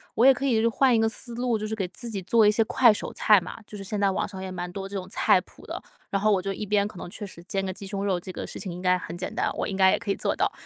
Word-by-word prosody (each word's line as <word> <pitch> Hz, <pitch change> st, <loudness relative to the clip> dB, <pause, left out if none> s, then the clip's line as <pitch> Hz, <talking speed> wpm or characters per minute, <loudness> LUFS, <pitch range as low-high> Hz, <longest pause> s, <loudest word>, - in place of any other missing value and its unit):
我 235 Hz, -, +4 dB
也 270 Hz, -, +9 dB
可 275 Hz, +1 st, -3 dB
以 230 Hz, -4 st, +3 dB
换 250 Hz, +3 st, +3 dB
一 -, -, +3 dB
个 225 Hz, -, +3 dB
思 235 Hz, +1 st, -6 dB
路， 240 Hz, -2 st, 0 dB
就 215 Hz, -, -3 dB
是 220 Hz, -, -3 dB
给 195 Hz, -4 st, -2 dB
自 235 Hz, +6 st, -7 dB
己 200 Hz, -4 st, -4 dB
做 220 Hz, +3 st, +4 dB
一 -, -, +7 dB
些 225 Hz, +1 st, +3 dB
快 235 Hz, +2 st, +5 dB
手 210 Hz, -, -4 dB
菜 210 Hz, -2 st, +5 dB
嘛， 175 Hz, -, -8 dB
就 210 Hz, -, -9 dB
是 195 Hz, -, -7 dB
现 200 Hz, +1 st, -3 dB
在 200 Hz, -, +4 dB
网 190 Hz, -, -1 dB
上 190 Hz, -2 st, -8 dB
也 190 Hz, -, -5 dB
蛮 180 Hz, -1 st, -5 dB
多 195 Hz, +1 st, -6 dB
这 200 Hz, -, -7 dB
种 185 Hz, -2 st, -4 dB
菜 190 Hz, -, +3 dB
谱 -, -, -19 dB
的。 -, -, -4 dB, 0.3 s
然 195 Hz, -, -1 dB
后 215 Hz, -, +3 dB
我 190 Hz, -, +2 dB
就 195 Hz, +1 st, -2 dB
一 205 Hz, +2 st, -4 dB
边 205 Hz, 0 st, +2 dB
可 205 Hz, -2 st, -8 dB
能 175 Hz, -, -7 dB
确 205 Hz, +4 st, -7 dB
实 185 Hz, -3 st, -10 dB
煎 195 Hz, +1 st, -2 dB
个 190 Hz, -, -2 dB
鸡 195 Hz, +1 st, -8 dB
胸 200 Hz, 0 st, -3 dB
肉， 190 Hz, -3 st, +1 dB
这 185 Hz, +1 st, -8 dB
个 -, -, -5 dB
事 -, -, -7 dB
情 190 Hz, -, -5 dB
应 180 Hz, -, -7 dB
该 180 Hz, 0 st, +3 dB
很 175 Hz, -1 st, -7 dB
简 180 Hz, -, -4 dB
单， -, -, 0 dB
我 -, -, -1 dB
应 195 Hz, -, -3 dB
该 190 Hz, -1 st, +6 dB
也 -, -, +2 dB
可 200 Hz, -, -3 dB
以 -, -, +1 dB
做 -, -, 0 dB
到， -, -, +1 dB
200 Hz, 375 characters per minute, -26 LUFS, 190-220 Hz, 0.3 s, 也